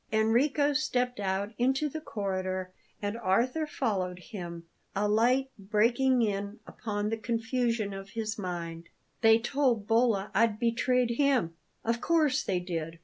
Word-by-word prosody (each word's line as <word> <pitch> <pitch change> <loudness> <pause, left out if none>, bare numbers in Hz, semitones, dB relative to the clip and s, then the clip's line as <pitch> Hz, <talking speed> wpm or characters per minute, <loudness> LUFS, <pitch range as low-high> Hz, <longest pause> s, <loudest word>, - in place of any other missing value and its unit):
Enrico 260 +7 +3
stepped 250 -4 0
out 200 +2 -1
into 265 +5 +2
the 315 +2 -5
corridor 185 -5 -3 0.3
and 205 +1 -1
Arthur 240 +10 +1
followed 190 -11 -1
him, 175 -4 -7 0.3
a 205 +2 +1
light 250 +5 +2
breaking 235 +5 +2
in 200 0 -2
upon 210 -1 -3
the 225 - -1
confusion 230 -1 -1
of 195 0 -8
his 220 0 -3
mind. 170 -3 -5 0.3
"They 225 -1 +7
told 240 -2 +1
Bolla 225 -3 +2
I'd 220 +1 +3
betrayed 235 +1 +1
him? 270 - +2 0.3
Of 230 +1 0
course 310 -5 +2
they 185 -2 -1
did! 165 -2 -4
225 Hz, 140 wpm, -29 LUFS, 195-250 Hz, 0.3 s, They